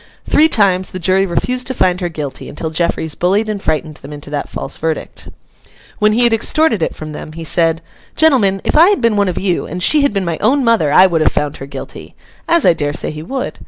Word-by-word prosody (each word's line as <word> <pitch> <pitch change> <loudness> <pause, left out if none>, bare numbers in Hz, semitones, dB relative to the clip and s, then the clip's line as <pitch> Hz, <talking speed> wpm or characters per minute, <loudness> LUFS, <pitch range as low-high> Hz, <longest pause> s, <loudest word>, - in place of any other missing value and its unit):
Three 315 +1 +4
times 190 -6 +2
the - - -7
jury 190 +2 +1
refused 250 +8 -2
to 260 - -3
find 180 -2 +1
her 175 - -2
guilty, 150 -4 -6
until 160 - -5
Jeffreys 160 -1 -2
bullied 200 +5 0
and 210 -2 -4
frightened 155 -2 -2
them 140 - -12
into 145 0 -9
that 145 -1 -4
false - - -6
verdict. 160 0 -4 0.7
When 210 0 +3
he 240 +3 +2
had 235 -1 +3
extorted 235 - +1
it - - -2
from 155 0 -8
them, 155 +1 -8
he 165 +1 -8
said, 165 0 +1 0.3
'Gentlemen, 220 -12 +3
if - - -1
I 330 +5 +7
had 410 - +1
been 230 -2 +2
one 200 -1 +1
of 180 - -4
you, 185 -3 -1
and 180 +3 -5
she 300 +7 +5
had 280 - +2
been 195 -2 -2
my 170 -2 -3
own 265 +6 +2
mother, 225 -11 +2
I 185 - +7
would 170 -4 +1
have - - +3
found 150 0 -2
her 135 - -9
guilty;'—as 335 - -4
I - - +6
dare 145 -2 -3
say - - -2
he 155 0 -8
would. 260 +11 -5
185 Hz, 235 wpm, -15 LUFS, 160-225 Hz, 0.7 s, I